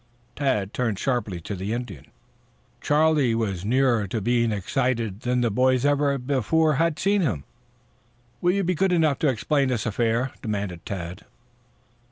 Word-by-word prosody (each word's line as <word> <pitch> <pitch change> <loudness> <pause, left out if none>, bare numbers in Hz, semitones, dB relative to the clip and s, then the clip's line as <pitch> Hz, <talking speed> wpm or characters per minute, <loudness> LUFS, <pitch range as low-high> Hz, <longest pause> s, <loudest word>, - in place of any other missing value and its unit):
Tad 115 -9 0
turned 115 -5 -1
sharply 110 -7 -1
to 100 - -6
the 100 +3 -3
Indian. 115 - -6 0.7
Charlie 150 -5 +3
was 100 -6 -2
nearer 120 -2 +2
to 110 +4 -2
being 115 +2 +1
excited 115 0 -1
than 125 +1 0
the 120 -2 +1
boys 130 +3 +2
ever 145 -1 +2
before 145 +4 +1
had 165 0 +1
seen 200 +2 +2
him. 105 - -1 1.0
"Will 175 0 +3
you 200 0 0
be 180 +1 +1
good 190 +3 +1
enough 160 -5 +2
to 155 - +2
explain 135 +3 +1
this 120 -4 -1
affair?" 115 +3 0
demanded 100 -6 -4
Tad. 90 -3 -6
125 Hz, 155 wpm, -24 LUFS, 105-145 Hz, 1.0 s, Charlie